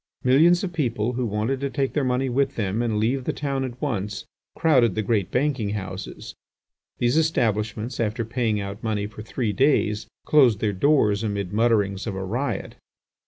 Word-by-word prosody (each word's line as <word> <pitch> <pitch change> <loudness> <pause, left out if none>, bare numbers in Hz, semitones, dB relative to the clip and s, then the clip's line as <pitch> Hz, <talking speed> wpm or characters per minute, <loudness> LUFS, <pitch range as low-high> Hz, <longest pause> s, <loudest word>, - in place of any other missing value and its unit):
Millions 160 +8 +5
of 180 -2 -3
people, 125 -7 -1
who 125 0 -1
wanted 110 +6 -1
to 140 0 -2
take 135 +1 -1
their 150 - +1
money 130 +1 0
with 135 +2 0
them 105 +1 -1
and 115 -3 0
leave 125 +5 0
the - - 0
town 140 -2 -2
at 125 -1 -6
once, 105 -8 -3 0.3
crowded 125 - +3
the 110 - 0
great 100 -2 0
banking 125 -6 0
houses. 95 -2 -6 0.6
These 120 +4 +2
establishments, 115 -5 -1
after 115 +1 -1
paying 115 -2 0
out 100 +1 -6
money 105 -2 -1
for 105 +1 -9
three 110 0 -2
days, 110 -4 +2 0.2
closed 130 -8 +5
their 105 -1 0
doors 105 -2 +3
amid 100 -3 -3
mutterings 105 -3 +1
of 100 - -3
a 95 - -4
riot. 125 +9 -3
115 Hz, 175 wpm, -24 LUFS, 105-135 Hz, 0.6 s, Millions